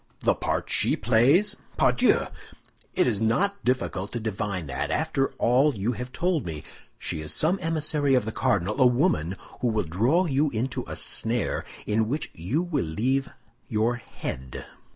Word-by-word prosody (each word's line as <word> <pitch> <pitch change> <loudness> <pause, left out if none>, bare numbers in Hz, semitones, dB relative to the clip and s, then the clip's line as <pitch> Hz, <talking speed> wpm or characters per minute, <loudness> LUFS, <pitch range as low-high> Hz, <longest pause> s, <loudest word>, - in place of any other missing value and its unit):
"The - - +3
part - - -2
she - - +3
plays, 135 - +3 0.2
pardieu! - - +3 0.7
It - - +4
is 110 -4 0
not 200 - +1
difficult 105 -6 -1
to 120 - -2
divine 105 -5 -3
that, 70 - -3
after 150 -3 +1
all 130 +5 +3
you 105 +4 -1
have 125 +1 -6
told 175 -1 0
me. 80 -3 -6 0.3
She 80 - -4
is 75 - 0
some 175 +5 +3
emissary 155 -3 +1
of 125 - +2
the 110 - -3
cardinal; 100 +5 0
a 130 - +8
woman 95 - +1 0.2
who 125 - 0
will 110 -2 +1
draw 115 - +2
you 145 -1 +2
into 120 +2 -2
a - - -5
snare 115 -1 -2 0.2
in 110 +1 +1
which 150 +3 -2
you 115 - -1
will 155 -7 -1
leave 130 +12 0 0.4
your 115 +3 +1
head." 65 - -7
120 Hz, 165 wpm, -26 LUFS, 105-145 Hz, 0.7 s, a